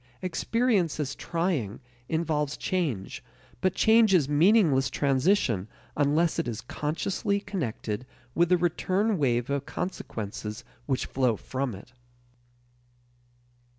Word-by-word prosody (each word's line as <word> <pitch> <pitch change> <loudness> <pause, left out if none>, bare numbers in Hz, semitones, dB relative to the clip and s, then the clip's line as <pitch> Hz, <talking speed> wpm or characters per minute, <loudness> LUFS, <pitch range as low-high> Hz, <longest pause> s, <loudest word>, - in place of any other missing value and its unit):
Experience 190 -1 +1
as 140 -2 -2
trying 160 - -2 0.3
involves 155 -3 0
change, 150 - -2 0.4
but 185 0 +1
change 220 -3 +5
is 150 -7 +3
meaningless 150 -3 +4
transition 135 - +1 0.3
unless 150 +3 +2
it - - -1
is 115 -1 -4
consciously 180 - -2
connected 125 - -4 0.3
with 170 0 +3
the 180 - +5
return 185 +4 +1
wave 120 -2 +1
of 140 0 -2
consequences 110 - -5 0.2
which 130 -3 0
flow 130 -4 +1
from 130 +1 -3
it. 100 +6 -14
150 Hz, 110 wpm, -27 LUFS, 125-185 Hz, 0.4 s, change